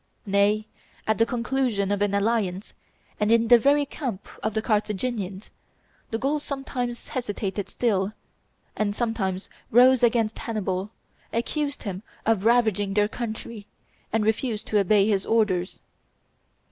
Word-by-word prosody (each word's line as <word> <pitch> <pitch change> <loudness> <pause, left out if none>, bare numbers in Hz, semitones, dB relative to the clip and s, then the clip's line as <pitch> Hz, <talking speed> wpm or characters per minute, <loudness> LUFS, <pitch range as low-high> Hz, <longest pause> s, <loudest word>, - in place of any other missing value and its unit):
Nay, 205 +1 +2 0.4
at 220 0 +1
the 225 - +4
conclusion 235 -5 0
of 205 0 0
an 205 -1 +2
alliance, 200 -2 0 0.5
and 210 +1 +2
in 230 0 +4
the 240 -1 +8
very 285 +4 +3
camp 255 -8 -5
of 215 0 -2
the 220 - +1
Carthaginians, 210 -2 -2 0.6
the 225 - -1
Gauls 285 +5 0
sometimes 255 -4 -4
hesitated 205 -5 -3
still, 200 -4 0 0.6
and 205 -1 -1
sometimes 200 -6 -2 0.2
rose 250 +2 +6
against 230 -2 +2
Hannibal, 195 -3 -2 0.4
accused 285 +5 -2
him 195 -4 -4 0.2
of 220 -3 +2
ravaging 220 -4 +3
their 205 0 +4
country, 220 -1 -6 0.4
and 220 -1 +1
refused 220 0 0
to 210 - +3
obey 200 +1 +4
his 200 -3 +2
orders. 205 -5 +1
220 Hz, 135 wpm, -25 LUFS, 200-240 Hz, 0.6 s, the